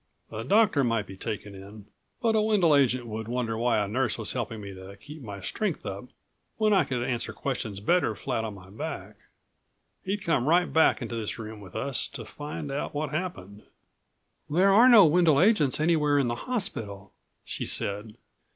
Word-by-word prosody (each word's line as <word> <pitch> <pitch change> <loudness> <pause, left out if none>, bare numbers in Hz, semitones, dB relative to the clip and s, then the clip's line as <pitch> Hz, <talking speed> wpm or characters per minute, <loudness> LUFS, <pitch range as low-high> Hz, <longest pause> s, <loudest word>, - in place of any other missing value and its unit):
A 110 0 -5
doctor 200 - +3
might 115 -4 0
be 95 - -10
taken 105 +1 -5
in, 100 +2 -12 0.4
but 225 -1 +3
a 215 - +4
Wendel 200 -8 +3
agent 130 -3 +2
would 110 -1 -6
wonder 120 -1 -2
why 120 +1 +1
a 105 -1 0
nurse 120 +3 -1
was 110 -3 -4
helping 115 -3 -4
me 100 -1 -8
to 95 +1 -11
keep 145 +9 -12
my 100 -5 -8
strength 215 - -3
up - - -5 0.5
when 215 -1 +3
I 190 -6 +4
could 125 -3 -2
answer 125 -2 -2
questions 115 -7 -4
better 110 - +1
flat 115 - -3
on 110 -2 -5
my 95 -1 -14
back. 105 - -6 0.9
He'd 195 +1 -3
come 145 -6 +1
right 175 +3 +4
back 160 -4 +4
into 115 0 -5
this 110 -2 -4
room 110 -2 -8
with 95 -3 -13
us, 140 -2 -1
to 115 -5 -8
find 145 +3 -7
out 140 +1 -4
what 145 -1 -2
happened." 150 - -5 0.9
"There 185 +6 +4
are 230 +6 +7
no 220 -6 +9
Wendel 160 -2 +4
agents 170 - +3
anywhere 150 -2 +2
in 135 -4 +2
the 120 - -5
hospital," 105 - -4 0.3
she - - -4
said. 105 +2 0
125 Hz, 190 wpm, -27 LUFS, 105-165 Hz, 0.9 s, no